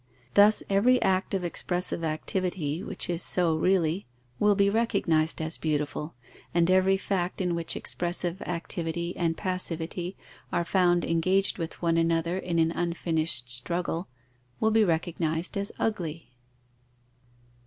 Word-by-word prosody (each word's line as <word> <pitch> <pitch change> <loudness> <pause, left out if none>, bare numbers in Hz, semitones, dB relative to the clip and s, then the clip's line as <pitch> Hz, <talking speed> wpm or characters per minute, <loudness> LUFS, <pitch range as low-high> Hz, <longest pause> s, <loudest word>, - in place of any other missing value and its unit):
Thus 205 +1 +6
every 230 +6 +4
act 190 +1 +1
of 190 - -2
expressive 175 0 +2
activity, 165 0 -2
which 200 -2 -2
is 175 0 -2
so 170 -3 +2
really, 175 0 +1 0.3
will 210 -1 +4
be 200 0 +3
recognized 170 -7 +1
as 160 +1 -4
beautiful, 150 -1 -2 0.4
and 170 +1 +3
every 190 +1 +4
fact 190 -2 -2
in 180 -2 0
which 170 -1 -1
expressive 175 +1 -2
activity 170 0 -3
and 165 -2 -1
passivity 180 0 -3 0.3
are 170 - 0
found 175 -1 +2
engaged 185 +4 +1
with 165 +1 -6
one 165 -1 +2
another 165 +2 +1
in 175 -2 -2
an 165 0 +3
unfinished 165 -6 +1
struggle, 170 +7 -2 0.5
will 220 - +2
be 220 0 +4
recognized 165 -1 -1
as 200 +1 -2
ugly. 170 -9 -3
175 Hz, 130 wpm, -27 LUFS, 165-190 Hz, 0.5 s, Thus